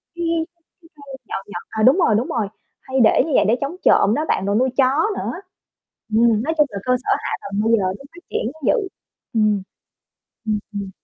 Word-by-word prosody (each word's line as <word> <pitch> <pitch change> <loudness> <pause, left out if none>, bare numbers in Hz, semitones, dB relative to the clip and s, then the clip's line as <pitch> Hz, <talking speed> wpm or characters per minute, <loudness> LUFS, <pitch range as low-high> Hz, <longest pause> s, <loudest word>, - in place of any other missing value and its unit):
cái 345 - -3 0.6
cái 330 - -20
cây 280 -2 -10
nhọn 195 - -4
nhọn. 175 -4 -7
À, 220 - -2
đúng 265 +7 +6
rồi, 280 - +3
đúng 240 - -1
rồi, 220 -4 -1 0.3
hay 260 0 -2
để 225 - +5
như 320 - -4
vậy - - +4
để 225 - +4
chống 280 +5 -3
trộm 210 - +5
đó 305 - -1
bạn 190 - 0
rồi 200 +1 0
nuôi 255 +3 +2
chó 275 +7 +3
nữa. - - -3 0.8
Ừm, 225 0 +3
nói 320 +3 -1
chung 300 - +5
là 200 - -6
cơ 250 - +3
sở - - -5
hạ - - -4
tầng 200 +1 -3
bây 225 - +2
giờ 205 -4 +3
nó 190 +8 -4
phát 350 - -13
triển 230 - -2
cũng 315 -2 -19
dữ, 430 -6 +2 0.5
ừm. 215 -3 +2 0.9
Ừm, 215 -1 +1
ừm. 200 -2 -5
235 Hz, 225 wpm, -21 LUFS, 210-280 Hz, 0.9 s, đúng